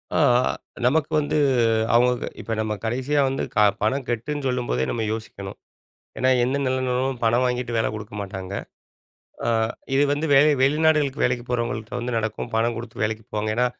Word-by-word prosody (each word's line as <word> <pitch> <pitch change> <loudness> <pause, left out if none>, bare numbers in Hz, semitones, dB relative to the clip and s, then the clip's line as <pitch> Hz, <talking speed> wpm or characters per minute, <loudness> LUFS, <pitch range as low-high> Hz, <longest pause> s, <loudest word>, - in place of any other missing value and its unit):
ஆ - - +3 0.7
நமக்கு 155 +4 +2
வந்து 150 +1 -1 0.6
அவங்க 125 0 +3
இப்போ 115 +2 -4
நம்ம 110 -1 -1
கடைசியா 130 +6 0
வந்து 135 - -2
க - - -4 0.2
பணம் 125 +5 0
கட்டுன்னு 140 +5 -2
சொல்லும்போதே 120 - -1
நம்ம 115 - -2
யோசிக்கணும். 100 -3 -7 0.6
ஏன்னா, 130 0 +3
எந்த 130 +3 0
நிறுவனமும் 130 0 0
பணம் 120 +3 +3
வாங்கிட்டு 125 -1 -1
வேலை 110 - +2
குடுக்க 105 -1 -8
மாட்டாங்க. 95 -1 -6 0.9
ஆ. - - 0 0.5
இது 140 +2 +4
வந்து 145 +2 -1
வேலை 145 +3 +6
வெளிநாடுகளுக்கு 150 0 +2
வேலைக்கு 125 -1 0
போகிறவங்கள்கிட்ட 115 -2 -2
வந்து 120 0 -3
நடக்கும். 110 +2 -3
பணம் 115 +1 +1
கொடுத்து 115 -1 -6
வேலைக்கு 110 0 -3
போவாங்க. 110 0 -1
ஏன்னா, 125 - +3
125 Hz, 155 wpm, -23 LUFS, 110-135 Hz, 0.9 s, வேலை